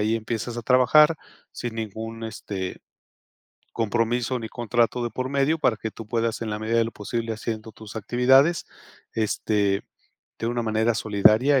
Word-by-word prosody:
allí 110 +2 +2
empiezas 115 +1 -4
a 120 - -4
trabajar 150 +6 +5 0.4
sin 120 -2 -5
ningún, 115 +1 -5
este, 100 -4 -5 0.9
compromiso 120 +2 0
ni 115 - -5
contrato 120 0 0
de 120 - -1
por 130 +2 -3
medio 140 +3 +1
para 125 -6 +2
que 110 - -5
tú 115 0 -10
puedas 115 0 -1
en 115 - -3
la 105 0 -3
medida 110 +2 0
de 115 - +3
lo 115 - -5
posible 115 +2 -3
haciendo 110 0 -5
tus 110 0 -11
actividades, 130 - +3 0.5
este, 105 -2 0 0.6
de 115 - -2
una 120 0 -1
manera 110 +1 +1
solidaria 110 +6 +4
115 Hz, 160 wpm, -25 LUFS, 110-120 Hz, 0.9 s, trabajar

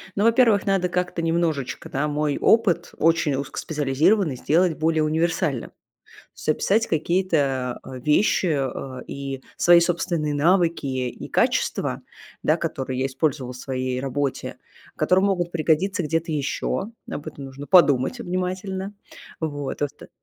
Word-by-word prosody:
Ну, 200 - +1
во-первых, 230 -2 +4
надо 195 -2 +1
как-то 180 -1 -1
немножечко, 165 -5 -1
да, 140 +3 -1
мой 150 -1 -1
опыт, 225 -6 +3
очень 165 -3 +2
узкоспециализированный, 150 +5 +1
сделать 165 +5 +2
более 160 0 +2
универсальным, 155 -4 0
то - - -33 0.6
есть - - -9
описать 205 +8 +2
какие-то, 150 -7 0
а, 130 - -9
вещи, 150 - +2
э, 135 -4 -2
и 135 -1 -6
свои 175 0 +6
собственные 170 -3 0
навыки 170 +1 +2
и 130 -2 -3
качества, - - 0 0.4
да, - - +3
которые 130 -1 -3
я 135 - +1
использовала 135 -1 -1
в 125 - -10
своей 130 -1 -3
работе, 135 +1 -3 0.4
которые 185 +1 +3
могут 180 -3 0
пригодиться 170 +4 +1
где-то 165 +1 -1
ещё. 150 +7 -2 0.2
Об 145 - -6
этом 140 - -7
нужно 135 +2 -9
подумать 150 - +4
внимательно. 190 +1 -3 0.5
Вот, 145 -3 -4
в - - +3
оста 145 - -9
155 Hz, 135 wpm, -23 LUFS, 140-180 Hz, 0.6 s, свои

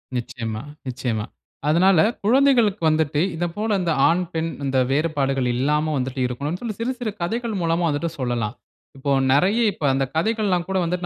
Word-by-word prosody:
நிச்சயமா, 115 -2 -4 0.3
நிச்சயமா. 120 -4 -2 0.4
அதனால, 175 +2 +4 0.3
குழந்தைகளுக்கு 240 -5 +4
வந்துட்டு, 155 -1 +1
இத 175 +2 -1
போல 210 -1 0
இந்த 170 - 0 0.2
ஆண், 175 +2 +2
பெண் 165 0 -1
இந்த 135 -1 0
வேறுபாடுகள் 135 -3 0
இல்லாம 150 +4 +1
வந்துட்டு 130 +1 -3
இருக்கணும்ன்னு 145 - -4
சொல்லி, 225 -3 -4
சிறு 235 +3 -1
சிறு 225 -4 -2
கதைகள் 230 +4 -2
மூலமா 170 +1 +1
வந்துட்டு 155 +3 -1
சொல்லலாம். 120 -3 -2 0.4
இப்போ 140 +1 -2 0.2
நெறைய 180 +10 +3
இப்போ 160 - -5
அந்த 135 0 +1
கதைகள் 215 +5 +1
எல்லாம் 180 -2 +1
கூட 190 0 -1
வந்துட்டு 175 +1 -2
160 Hz, 165 wpm, -22 LUFS, 135-195 Hz, 0.4 s, அதனால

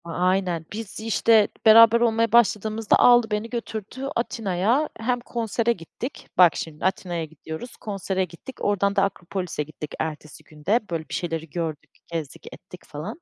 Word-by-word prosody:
A 170 - -11
aynen. 180 -2 0
Biz, 215 -1 -6
işte, 220 -1 +3 0.2
beraber 230 +1 +8
olmaya 230 -1 +2
başladığımızda 220 -1 +3
aldı 240 -2 +6
beni, 210 +2 -2
götürdü 235 +2 -5
Atina'ya. 225 - 0
Hem 245 +2 0
konsere 235 -1 -1
gittik. 230 - -8
Bak, 175 -4 +7
şimdi 160 0 -5
Atina'ya 175 -3 -1
gidiyoruz, 160 - -9
konsere 195 -2 -2
gittik. 180 +9 -12
Oradan 200 0 +1
da 195 - +3
Akropolis'e 185 -4 -3
gittik 150 0 -9
ertesi 155 -2 -5
gün 150 -1 -17
de. 215 +5 +4
Böyle, 165 -2 -4
bir - - -7
şeyleri 165 -2 -3
gördük, 160 -1 -4 0.2
gezdik 160 -4 -6
ettik, 180 0 -13
falan. 180 - -7
195 Hz, 155 wpm, -24 LUFS, 170-230 Hz, 0.2 s, beraber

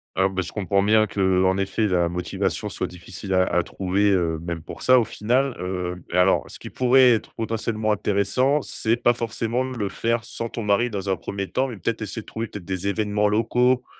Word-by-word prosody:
Ah 95 +2 +3
ben, 95 -1 -2
je 85 - -6
comprends 100 -1 0
bien 110 +1 +4
que, 95 -3 +1
en 95 0 +2
effet, 100 +2 0
la 90 -3 +1
motivation 90 +1 -2
soit - - -3
difficile 90 +2 -7
à 95 0 +4
à 90 -1 +1
trouver, 100 +3 0
heu, 85 -4 +1
même 85 -1 -4
pour 80 - -10
ça, 130 0 +6
au 115 - +1
final, 125 +6 0
heu 90 -1 -4
et 90 - 0
alors 90 +1 +4
ce - - -10
qui - - -8
pourrait 130 0 +5
être 110 -3 -1
potentiellement 110 -1 -1
intéressant, 105 +9 +1
c'est 115 -3 -1
pas 120 0 +3
forcément 115 +1 -2
le 125 -6 -3
faire 115 +3 -1
sans 115 -1 -5
ton 115 - -5
mari, 105 +4 +2
dans 100 -3 -4
un 95 - +2
1er 100 +3 -5
temps, 135 +1 0
mais 115 - -7
peut-être 110 +5 -2
essayer 110 +1 -5
de - - -30
trouver, 115 +1 -5
peut-être, 100 -4 -9
des 95 +1 -2
évènements 105 0 +1
locaux, 125 +4 +2
105 Hz, 220 wpm, -23 LUFS, 95-115 Hz, -, ça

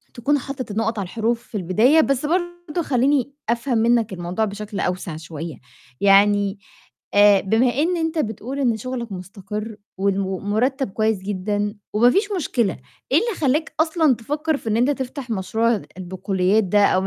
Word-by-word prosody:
تكون 280 +5 +1
حاطط 260 -4 -6
النقط 225 +1 -1
على 195 - -2
الحروف 230 +5 -1
في - - -12
البداية، 215 - +4
بس 275 -1 0
برضه 350 0 -2
خلّيني 275 0 +1 0.2
أفهم 235 +1 0
منّك 230 -2 +2
الموضوع 180 +4 -2
بشكل 205 0 -6
أوسع 180 -3 -2
شوية، 160 -1 -7 0.5
يعني 200 0 +4 0.5
آآ، 205 -1 +6
بما 220 +6 +2
إن 335 +6 +1
أنت 325 0 -1
بتقول 240 +3 -3
إن 235 -5 +2
شُغلك 240 -1 -5
مستقر 200 +3 -6 0.2
والم 195 0 +1
المُرتّب 240 +7 0
كويس 215 0 +1
جدًا 205 +1 -2 0.2
وما 235 +3 +5
فيش 405 - +1
مشكلة، 235 - 0 0.4
إيه - - +7
اللي 465 0 -2
خلّاك 300 +3 +1
أصلًا 315 -4 +3
تفكّر 295 +6 -2
في 225 - -6
إن 215 - +1
أنت 245 +4 +3
تفتح 265 -1 -5
مشروع 220 +2 0 0.2
البقوليات 190 +2 0
ده 205 +2 +4
أو 185 - +2
225 Hz, 160 wpm, -22 LUFS, 200-275 Hz, 0.5 s, إيه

